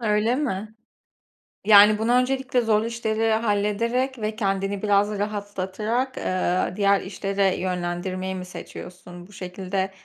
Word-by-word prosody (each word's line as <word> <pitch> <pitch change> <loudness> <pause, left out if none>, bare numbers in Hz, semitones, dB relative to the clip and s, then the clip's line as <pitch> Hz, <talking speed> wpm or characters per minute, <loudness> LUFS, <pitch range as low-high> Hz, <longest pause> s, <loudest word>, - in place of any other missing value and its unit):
Öyle 215 +1 +1
mi? 220 -7 -3 0.9
Yani, 210 0 +7
bunu 225 +2 +1
öncelikle 255 0 +1
zorlu 220 -1 +1
işleri 225 -1 0
hallederek 230 +4 0
ve 215 0 -3
kendini 195 -2 -1
biraz 205 0 +2
rahatlatarak, 205 +4 -3
eee, 185 -1 0
diğer 200 -1 +3
işlere 195 0 -1
yönlendirmeyi 185 +1 -3
mi 185 - -5
seçiyorsun? 180 -1 -10
Bu 205 - -19
şekilde, 190 +1 -4
205 Hz, 120 wpm, -24 LUFS, 190-225 Hz, 0.9 s, Yani